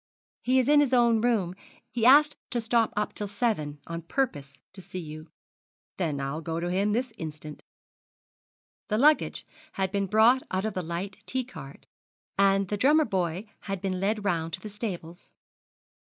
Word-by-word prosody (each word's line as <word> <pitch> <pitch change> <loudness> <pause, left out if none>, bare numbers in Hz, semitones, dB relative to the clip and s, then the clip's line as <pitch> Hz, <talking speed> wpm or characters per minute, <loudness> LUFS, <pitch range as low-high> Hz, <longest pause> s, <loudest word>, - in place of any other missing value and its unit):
'He 255 +1 +2
is 255 -1 +3
in 295 0 +6
his 280 -3 +2
own 235 -2 +4
room. 220 -7 +1 0.4
He 235 -1 +2
asked 295 +3 +7
to 245 - -1
stop 230 0 +2
up 210 - -1
till 205 - -4
seven 200 -9 -1
on 165 0 -5
purpose 150 - -2 0.2
to 190 - -9
see 185 +1 -9
you.' 155 -2 -7 0.7
'Then 155 -6 -1
I'll 140 +3 -3
go 165 +1 -3
to 175 +1 -2
him 200 +3 +1
this 240 +2 -1
instant.' 155 -1 -7 1.3
The 215 - 0
luggage 300 +5 +3 0.3
had 190 -1 -1
been 200 -1 0
brought 225 +6 +5
out 185 +2 -1
of 220 - -2
the 185 - -2
light 175 +4 -5
T 260 0 0
cart, 140 - -11 0.5
and 195 0 +3
the 205 - -1
Drummer 295 +7 +4
Boy 185 - -2 0.2
had 195 -1 -2
been 185 -1 -2
led 205 +2 -1
round 165 -4 -1
to - - -3
the 215 - -8
stables. 185 -5 -6
195 Hz, 175 wpm, -27 LUFS, 170-235 Hz, 1.3 s, asked